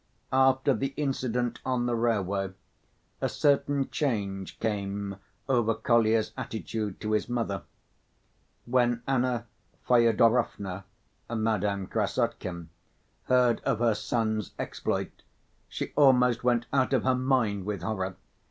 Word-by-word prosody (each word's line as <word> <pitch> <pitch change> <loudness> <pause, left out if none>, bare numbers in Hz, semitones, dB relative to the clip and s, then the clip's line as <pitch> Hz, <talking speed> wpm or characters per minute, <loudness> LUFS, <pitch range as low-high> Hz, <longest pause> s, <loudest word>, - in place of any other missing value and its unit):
After 130 +1 +4
the 135 +3 -3
incident 125 -4 -1
on 125 -2 0
the 120 - 0
railway 100 -5 0 0.7
a - - +1
certain 140 -1 +2
change 100 -9 -2
came 100 -2 -2 0.3
over 120 -4 +2
Kolya's 115 -3 +2
attitude 110 -4 -4
to 110 - -2
his 110 +2 0
mother. 115 -6 -1 1.0
When 120 -1 +1
Anna 125 -3 +1 0.4
Fyodorovna 115 -5 +3 0.4
(Madame 105 -4 0
Krassotkin) 85 -2 -2 0.6
heard 125 -2 +3
of - - 0
her 115 0 +3
son's 110 -1 -2
exploit, - - -3 0.5
she - - -5
almost 125 -4 +4
went 120 -1 +2
out 135 0 +2
of 125 - +2
her 130 - +3
mind 125 -7 +1
with 100 -5 -3
horror. 95 -3 -2
115 Hz, 115 wpm, -28 LUFS, 105-125 Hz, 1.0 s, After